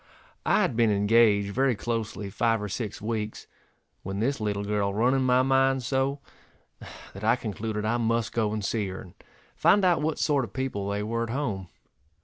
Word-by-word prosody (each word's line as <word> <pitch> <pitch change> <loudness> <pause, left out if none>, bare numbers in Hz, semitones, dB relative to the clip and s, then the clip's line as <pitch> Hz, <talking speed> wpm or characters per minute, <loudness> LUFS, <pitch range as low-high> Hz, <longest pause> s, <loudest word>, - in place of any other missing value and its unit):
I - - +4
had - - -1
been 115 -1 +3
engaged 105 0 +3
very 130 0 +2
closely 110 -3 -4
five 115 +2 +1
or 105 - -4
six 105 0 -5
weeks, 110 -1 -3 0.6
when 95 +1 -5
this 135 +3 0
little 100 -1 -1
girl 100 -1 0
run 115 +6 +2
in 135 - +2
my 130 0 +3
mind 135 0 +2
so, 135 +2 -1 0.9
that 100 - -10
I 110 +2 +4
concluded 110 -2 -4
I 115 +2 +1
must 115 -1 0
go 110 -2 0
and 105 -2 -3
see 105 -2 -1
her, 95 0 -6
and 90 - -12 0.4
find 205 -2 +4
out 175 -4 +3
what 155 +1 -1
sort 145 -3 +1
of - - -8
people 125 -7 -3
they 100 +1 -2
were 115 +2 -2
at 115 - -2
home. 115 -8 -3
115 Hz, 190 wpm, -27 LUFS, 105-130 Hz, 0.9 s, I